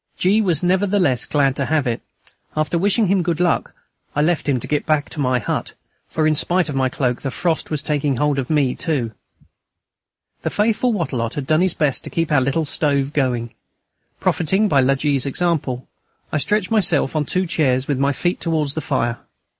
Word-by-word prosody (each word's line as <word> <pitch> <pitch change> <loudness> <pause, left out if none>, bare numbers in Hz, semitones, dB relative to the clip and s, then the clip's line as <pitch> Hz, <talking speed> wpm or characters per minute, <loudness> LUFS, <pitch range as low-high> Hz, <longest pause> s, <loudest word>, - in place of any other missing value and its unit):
G. 200 +4 +3
was 180 -6 0
nevertheless 185 - +2
glad 140 -3 +2
to 140 - -1
have 155 -3 +1
it. 120 -2 -2 0.6
After 155 +2 0
wishing 200 +5 +2
him 195 0 +2
good 170 -2 -1
luck, 175 -2 0 0.4
I 145 - +2
left 165 -2 0
him 130 -3 +2
to - - -3
get 150 -1 0
back 155 -2 +1
to - - -7
my 130 -2 +2
hut, 115 - -3 0.3
for, 155 - -1
in 155 - +4
spite 175 +3 +2
of 145 - -4
my 130 -1 +1
cloak, 125 -2 -1
the 135 - -2
frost 165 +4 -1
was 150 -2 -2
taking 145 -3 0
hold 145 +1 +1
of 130 - -4
me 145 -5 +2
too. 135 -9 -2 1.3
The - - -1
faithful 225 +4 +1
Wattrelot 130 - -2
had 145 - -3
done 155 +3 +2
his 185 0 +2
best 145 -4 +1
to - - -5
keep 165 -2 -1
our 145 -3 +4
little 140 +5 0
stove 140 -1 0
going. 125 -5 -1 0.7
Profiting 190 +6 +1
by 140 -8 +3
La 135 +1 +3
G.'s 140 -1 +1
example, 140 -5 -1 0.4
I 155 - 0
stretched 210 - 0
myself 170 -10 +3
on 155 - +2
two 185 +1 0
chairs, 135 -6 +1
with 140 -3 -1
my 140 +1 +2
feet 175 +5 -1
towards 155 -4 0
the 155 - -3
fire. 120 -4 -1
150 Hz, 200 wpm, -20 LUFS, 135-175 Hz, 1.3 s, in